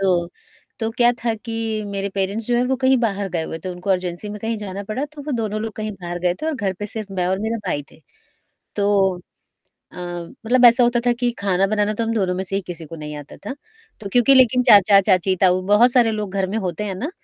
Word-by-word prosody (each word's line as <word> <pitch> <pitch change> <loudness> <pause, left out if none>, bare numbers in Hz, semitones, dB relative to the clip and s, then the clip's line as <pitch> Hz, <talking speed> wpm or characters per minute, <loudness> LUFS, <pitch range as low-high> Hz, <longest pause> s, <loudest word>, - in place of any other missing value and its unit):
तो 180 -3 +1 0.5
तो 225 0 -1
क्या 240 +1 +3
था 230 -2 +1
कि, 225 -1 -4
मेरे 200 0 -3
पेरेंट्स 200 +3 -2
जो 245 - +1
हैं 240 - +2
वो 265 +1 0
कहीं 260 +1 +3
बाहर 205 -4 -1
गए 170 -2 -1
हुए 160 0 -5
थे, 185 - -7
उनको 180 +2 -4
अर्जेंसी 180 +1 -1
में 210 - -6
कहीं 225 +1 -2
जाना 200 -1 -6
पड़ा, 220 +7 -3
तो 295 0 -10
वो 295 +1 -4
दोनों 215 -2 -2
लोग 225 -1 -4
कहीं 215 0 -4
बाहर 175 0 -5
गए 175 0 0
थे - - -1
और 320 - 0
घर 205 -7 -1
पे 205 - -4
सिर्फ़ 210 -1 -7
मैं 180 - +1
और 190 +1 0
मेरा 220 +3 -2
भाई 145 -5 -1
थे। - - -20 0.8
तो 200 -2 +2 0.8
अ, - - -15
मतलब 180 +8 -1
ऐसा 240 +1 +7
होता 240 0 +2
था 245 - +5
कि 245 -1 +2
ख़ाना 195 -1 +2
बनाना 210 +1 0
तो 230 - -1
हम 225 - -1
दोनों 190 -4 0
में 185 - -2
से 195 - -6
ही 195 - -2
किसी 170 -2 -7
को 165 - -9
नहीं 150 -1 -7
आता 145 -1 -10
था, 205 - -7 0.5
तो 205 - -6
क्योंकि 245 +2 +5
लेकिन 250 -1 +5
चाचा-चाची, 195 -2 +5
ताऊ 185 -1 +4
बहुत 225 +5 +5
सारे 240 -3 +4
लोग 210 -3 -4
घर 190 -1 +1
में - - 0
होते 180 +3 -3
हैं 200 -2 -3
ना? 250 - -4
205 Hz, 245 wpm, -21 LUFS, 185-230 Hz, 0.8 s, ऐसा